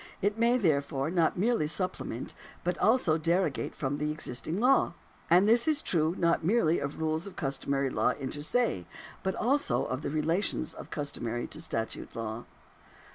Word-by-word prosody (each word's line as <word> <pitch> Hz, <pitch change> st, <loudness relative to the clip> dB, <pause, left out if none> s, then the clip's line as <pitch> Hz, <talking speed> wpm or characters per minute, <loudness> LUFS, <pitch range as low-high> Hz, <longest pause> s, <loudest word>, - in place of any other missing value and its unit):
It 205 Hz, +1 st, +1 dB
may, 235 Hz, +2 st, +3 dB
therefore, 140 Hz, -, 0 dB
not 170 Hz, -2 st, +2 dB
merely 210 Hz, -5 st, +2 dB
supple 185 Hz, +4 st, -2 dB
ment, 120 Hz, -, -5 dB, 0.3 s
but 180 Hz, +1 st, 0 dB
also 205 Hz, -9 st, +3 dB
derogate 170 Hz, -1 st, 0 dB
from 140 Hz, 0 st, -2 dB
the 150 Hz, +1 st, -1 dB
existing 155 Hz, +3 st, -2 dB
law. 255 Hz, +4 st, +3 dB, 0.3 s
And 180 Hz, +4 st, +6 dB
this 235 Hz, +4 st, +4 dB
is 305 Hz, -1 st, +2 dB
true 160 Hz, 0 st, +1 dB
not 170 Hz, -1 st, +2 dB
merely 175 Hz, -3 st, +3 dB
of 140 Hz, +2 st, -4 dB
rules 160 Hz, +3 st, 0 dB
of 195 Hz, -, -10 dB
customary 140 Hz, -2 st, -1 dB
law -, -, +2 dB
inter 140 Hz, +2 st, -4 dB
se, 160 Hz, -, 0 dB, 0.3 s
but 190 Hz, 0 st, -1 dB
also 275 Hz, +6 st, +1 dB
of 130 Hz, -, -3 dB
the -, -, -3 dB
relations 155 Hz, +2 st, 0 dB
of -, -, -10 dB
customary 120 Hz, -5 st, -3 dB
to 155 Hz, -, -6 dB
statute 115 Hz, -8 st, -4 dB
law." 115 Hz, +1 st, -4 dB
160 Hz, 170 wpm, -29 LUFS, 140-200 Hz, 0.3 s, And